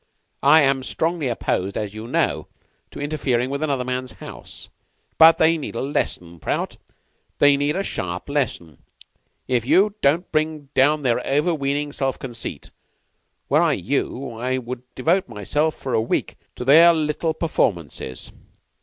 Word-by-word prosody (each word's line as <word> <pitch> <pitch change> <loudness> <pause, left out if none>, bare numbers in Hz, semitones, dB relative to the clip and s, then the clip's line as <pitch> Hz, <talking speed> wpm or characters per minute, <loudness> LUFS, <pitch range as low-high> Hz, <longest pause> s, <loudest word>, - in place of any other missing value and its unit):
I 150 +3 +6
am 135 -1 +2
strongly 160 +2 -1
opposed, 100 -5 -2
as 105 -2 -3
you 110 +2 -7
know, - - 0 0.4
to - - -10
interfering 135 -4 -1
with 140 +1 -3
another 140 -5 -1
man's 130 0 -3
house; - - -11 0.5
but 165 0 +8
they 160 +1 +3
need 140 - -6
a - - -2
lesson, 85 - -3
Prout. - - -3 0.6
They 145 0 +5
need 145 +2 0
a 195 - -1
sharp 90 - -4
lesson, 125 - -3 0.7
if 125 -3 +1
only 200 +7 +4
to 140 +3 +4
bring 155 -2 -1
down 145 +3 +3
their 125 -1 +1
over 150 +6 +1
weening 145 0 -1
self 135 -2 -2
conceit. 120 -3 -7 0.8
Were - - +3
I - - +3
you, 130 -1 -2
I 130 +2 -1
should 125 -1 -5
devote 170 +5 +1
myself 145 +9 -1
for 130 - -5
a - - +3
week 115 - -2 0.2
to 125 - -6
their 165 +5 +7
little 155 +1 -1
performances. 85 - -2
140 Hz, 155 wpm, -22 LUFS, 120-155 Hz, 0.8 s, but